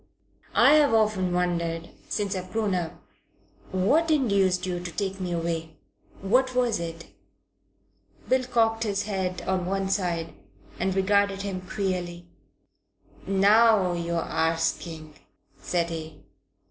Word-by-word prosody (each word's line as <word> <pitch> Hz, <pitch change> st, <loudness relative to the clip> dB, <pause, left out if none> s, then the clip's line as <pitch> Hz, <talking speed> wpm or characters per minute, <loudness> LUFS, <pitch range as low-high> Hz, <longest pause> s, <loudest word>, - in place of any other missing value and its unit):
"I've 295 Hz, -5 st, +6 dB
often 210 Hz, -4 st, +2 dB
wondered 170 Hz, -2 st, -1 dB, 0.2 s
since 205 Hz, -1 st, -1 dB
I've 185 Hz, 0 st, -6 dB
grown 215 Hz, -3 st, 0 dB
up 175 Hz, -2 st, -2 dB, 0.8 s
what 275 Hz, -, +2 dB
induced 200 Hz, -, +2 dB
you 180 Hz, -1 st, -2 dB
to 175 Hz, 0 st, -6 dB
take 195 Hz, +1 st, -3 dB
me 180 Hz, -1 st, -3 dB
away. 165 Hz, -2 st, -3 dB, 0.5 s
What 255 Hz, +6 st, +2 dB
was 245 Hz, -5 st, +1 dB
it?" 165 Hz, 0 st, -6 dB, 1.2 s
Bill 260 Hz, 0 st, +2 dB
cocked 225 Hz, -2 st, +1 dB
his 200 Hz, -3 st, -1 dB
head 190 Hz, -3 st, -3 dB
on 185 Hz, -1 st, -1 dB
one 195 Hz, 0 st, -1 dB
side 170 Hz, -5 st, -1 dB, 0.5 s
and 190 Hz, +1 st, 0 dB
regarded 200 Hz, 0 st, +2 dB
him 190 Hz, -2 st, -4 dB
queerly. 180 Hz, -2 st, -3 dB, 1.0 s
"Now 200 Hz, -1 st, +4 dB
you're 170 Hz, -1 st, -2 dB
arsking," 160 Hz, -1 st, -2 dB, 0.4 s
said 170 Hz, -1 st, -1 dB
he. 160 Hz, -1 st, -7 dB
185 Hz, 120 wpm, -26 LUFS, 170-205 Hz, 1.2 s, I've